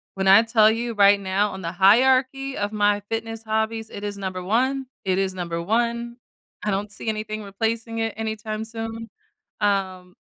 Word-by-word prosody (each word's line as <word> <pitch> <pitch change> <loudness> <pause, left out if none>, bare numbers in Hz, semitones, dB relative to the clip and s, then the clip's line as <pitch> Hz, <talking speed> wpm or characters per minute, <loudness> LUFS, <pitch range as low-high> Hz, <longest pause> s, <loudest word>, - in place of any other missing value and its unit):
when 190 0 -1
I 195 +3 +8
tell 220 -1 +5
you 230 +1 -1
right 200 -1 +5
now 200 +2 0
on 190 - -7
the 170 -1 -3
hierarchy 260 +7 +3
of 205 +1 -2
my 205 -1 +2
fitness 225 0 -4
hobbies, 220 0 -2
it 200 - -8
is 205 -1 -4
number 185 -2 -4
1, 260 +6 0 0.2
it 185 -1 +1
is 190 -1 0
number 170 -2 -4
1. 235 +4 -1 0.5
I 210 - +1
don't 200 +2 -2
see 215 - -8
anything 215 0 -3
replacing 225 +3 -3
it 225 -1 -1
anytime 220 0 -4
soon. 225 0 -6 0.5
Um, 190 -3 -1
215 Hz, 175 wpm, -23 LUFS, 195-225 Hz, 0.5 s, I